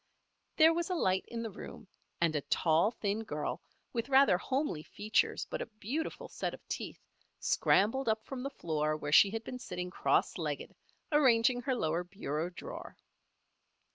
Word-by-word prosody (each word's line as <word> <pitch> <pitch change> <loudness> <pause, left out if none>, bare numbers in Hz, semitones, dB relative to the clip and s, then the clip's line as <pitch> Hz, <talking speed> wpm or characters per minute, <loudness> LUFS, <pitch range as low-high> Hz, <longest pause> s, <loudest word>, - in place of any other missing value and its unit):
There 320 +1 +7
was 340 +2 -1
a 365 - 0
light 190 - +1
in 230 -1 -4
the 225 - -4
room 195 - -10 0.3
and 165 -2 +2
a 145 - +1
tall, 160 +6 +3
thin 215 -1 -2
girl, 150 -7 -3 0.3
with 235 +2 -2
rather 270 -6 +6
homely 265 - -1
features 210 +6 0
but - - -4
a - - -4
beautiful 270 - -4
set - - -3
of - - -22
teeth, - - -5 0.4
scrambled 230 +6 +2
up 220 0 0
from 265 -2 -6
the 275 - -3
floor 155 - -1
where 145 -1 -4
she 195 - +8
had 225 +2 -4
been 250 - -6
sitting 180 -5 -5
cross - - +1
legged, - - -3 0.4
arranging 245 -4 +4
her 260 +1 0
lower 165 -5 0
bureau 175 -3 -3
drawer. 175 - -9
215 Hz, 170 wpm, -32 LUFS, 170-260 Hz, 0.4 s, she